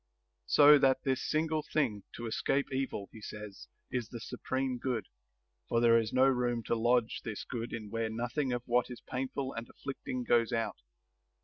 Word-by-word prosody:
So 145 0 +8
that 130 -1 +3
this 130 -1 0
single 155 0 +1
thing, 130 -9 0
to 120 - -6
escape 135 +4 0
evil, 130 -7 -2
he 110 - -12
says, 105 -1 -8 0.2
is 125 -3 -2
the 120 - -7
supreme 130 +2 -2
good; 120 -6 -1 0.6
for 115 - +3
there 115 -1 +6
is 110 -1 -2
no 130 +1 +5
room 125 -3 +1
to 115 - 0
lodge 120 0 +2
this 110 -3 -4
good 120 -1 -5
in 105 -3 -6
where 115 -1 -1
nothing 120 +5 -1
of 120 -1 -2
what 120 +1 +2
is 125 - -7
painful 135 +1 -3
and 115 +1 -6
afflicting 130 -2 -5
goes 120 -1 +3
out. 115 -1 -1
120 Hz, 180 wpm, -32 LUFS, 115-130 Hz, 0.6 s, So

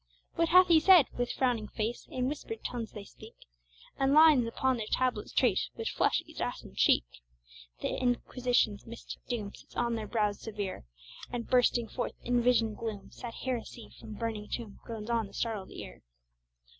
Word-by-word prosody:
What 335 -1 +1
hath 365 +1 +8
he 330 -2 +6
said? 350 -2 +7
With 245 0 -1
frowning 240 -5 0
face, 225 +3 -4
In 255 -1 -1
whispered 265 -6 -5
tones 230 -3 -4
they 210 - -8
speak, 220 +2 -14 0.6
And 270 +1 +3
lines 305 -6 +7
upon 260 +2 0
their 215 -2 -4
tablets 250 -4 0
trace, - - +2
Which - - -3
flush - - +1
each - - -9
ashen - - -4
cheek; - - +4 0.8
The - - -1
Inquisition's 245 -3 +1
mystic 230 +1 -9
doom 215 -5 -3
Sits - - -16
on 240 -1 0
their 220 -2 -3
brows 210 -3 0
severe, 205 - -5 0.5
And 240 -1 -3
bursting 245 -2 +3
forth 245 - -3
in 245 0 +2
visioned 230 -3 +2
gloom, 215 -4 -5
Sad 235 -2 -8
heresy 245 -2 -4
from 215 - -9
burning 220 -2 -4
tomb 225 -5 -6
Groans 225 -1 -6
on 230 -3 +1
the - - -15
startled 220 -5 -3
ear. - - -9
235 Hz, 170 wpm, -31 LUFS, 215-250 Hz, 0.8 s, hath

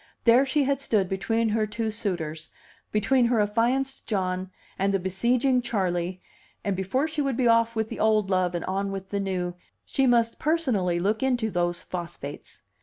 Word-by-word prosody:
There 250 +4 +5
she 290 +2 +2
had 275 0 0
stood 210 -8 +1
between 225 +4 0
her 215 0 +1
two 220 +1 -2
suitors, 170 -8 -4 0.4
between 235 +4 +3
her 235 -2 +2
affianced 240 +6 0
John 185 -3 -1 0.3
and 195 +1 +2
the 195 - +2
besieging 240 +8 +1
Charley, 185 -5 -2 0.4
and 200 -2 0
before 195 +11 0
she 310 -1 -2
would 275 -4 -1
be 250 - +2
off 230 0 +3
with 220 0 -1
the - - -6
old 215 -2 +2
love 180 -1 +1
and 170 - -3
on 195 +1 -1
with 195 -1 -6
the 200 - -1
new, 185 -2 -2 0.3
she 270 -1 +1
must 235 -2 +2
personally 245 - +1
look 205 +5 0
into 245 -4 +1
those 175 -1 -1
phosphates. 170 -5 -7
210 Hz, 180 wpm, -26 LUFS, 185-240 Hz, 0.4 s, There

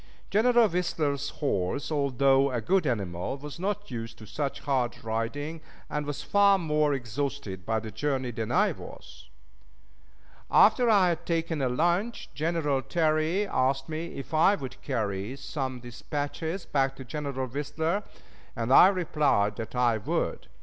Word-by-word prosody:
General 235 +2 +5
Whistler's 150 -6 -1
horse, 140 - -2
although 140 -1 +3
a 125 - -1
good 180 - +1
animal, 100 -1 -2
was 145 +2 -9
not 205 -1 -3
used 115 -1 -6
to 110 - -11
such 140 +5 -3
hard 130 -4 -1
riding, 115 +8 -3 0.3
and 150 -1 -2
was 145 - -4
far 200 -1 +5
more 150 -4 +1
exhausted 120 -6 -4
by 110 0 +1
the 110 0 -7
journey 130 +1 -1
than 110 -1 -4
I - - +3
was. - - -11 1.2
After 245 -2 +5
I 195 -5 +5
had 170 0 -3
taken 165 -2 -1
a 130 - +1
lunch, 175 - 0
General 150 -2 0
Terry 160 +5 +1
asked 135 -5 0
me 160 +2 -5
if 135 +3 -8
I 165 +6 +5
would 135 -8 -8
carry 110 -3 -2
some 135 -2 -4
dispatches 145 +8 -4
back 135 -1 0
to 135 - -9
General 140 -1 -3
Whistler, 150 - -2 0.5
and 115 +3 0
I 180 - +9
replied 150 - +1
that 115 +2 -6
I 120 -2 +3
would. - - -2
140 Hz, 150 wpm, -28 LUFS, 125-165 Hz, 1.2 s, I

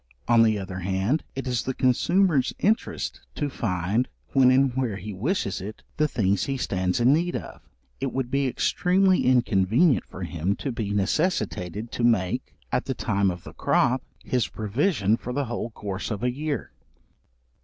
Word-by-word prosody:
On 115 -1 +5
the 110 -2 +4
other 95 -1 -5
hand, 95 - 0
it 135 - -4
is 125 -3 0
the 130 - -3
consumer's 145 +4 +2
interest 220 +3 -1
to 145 -2 -2
find, 100 +2 0 0.3
when 130 -2 +6
and 130 0 +4
where 125 -5 -1
he 105 +2 -6
wishes 105 - -1
it, 105 +3 -8
the 155 - +3
things 100 -8 +1
he 135 -1 -2
stands 95 -5 -1
in 125 +3 +5
need 175 +3 0
of; - - -7 0.4
it - - -2
would 130 -2 -3
be 140 0 +1
extremely 185 +8 +2
inconvenient 120 - +3
for 95 - -8
him 85 +3 -1
to 135 - -4
be 110 -4 -3
necessitated 105 - -1
to 120 - -3
make, 115 +1 +1 0.2
at - - 0
the 130 - -2
time 100 -4 +1
of 90 -1 -5
the - - -10
crop, 130 +2 +2 0.2
his 125 -2 0
provision 110 - +1
for 125 - -6
the 140 +1 0
whole 120 -1 -3
course 100 -3 -5
of 105 0 -4
a 125 - +2
year. 145 -2 -3
120 Hz, 175 wpm, -25 LUFS, 100-135 Hz, 0.4 s, when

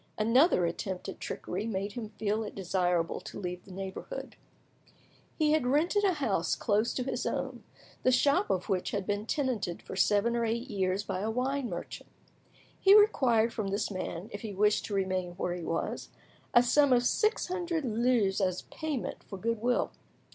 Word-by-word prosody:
Another 230 - +4
attempt 180 +3 -4
at - - -8
trickery 195 +5 -4
made 200 -1 -2
him 220 -1 -6
feel 215 0 -1
it 210 - -7
desirable 180 -3 0
to - - -9
leave 180 -1 -5
the 195 - -13
neighbourhood. 195 - -6 1.0
He 305 -2 +3
had 305 -5 +2
rented 330 +10 +2
a 385 -2 +4
house 210 - 0
close 210 +3 +1
to 255 - -1
his 265 - -2
own, - - -3 0.4
the 255 - +3
shop 285 +9 +3
of 185 - 0
which 185 -2 0
had 200 -2 -2
been 205 +2 -2
tenanted 245 - -1
for - - -7
seven 205 +4 +3
or 235 - +1
eight 230 +3 -1
years 190 0 0
by 185 - -3
a 210 +3 -1
wine 255 +2 -1
merchant. 175 -2 -7 0.7
He 390 +1 +7
required 240 - +3
from 215 -3 -2
this 200 +2 -1
man, 185 -1 -4
if 205 - -6
he 215 -3 -6
wished 210 +2 +2
to 205 - -3
remain 185 -2 -1
where 175 0 -2
he 175 -1 -5
was, 165 +1 -3 0.4
a 240 - +6
sum 280 +3 +4
of 245 0 +3
six 430 - +2
hundred 350 -4 -2
livres 225 -4 +2
as 185 -1 0
a - - -19
payment 305 -6 -3
for 195 - -7
goodwill. 230 +4 0
215 Hz, 185 wpm, -30 LUFS, 190-255 Hz, 1.0 s, He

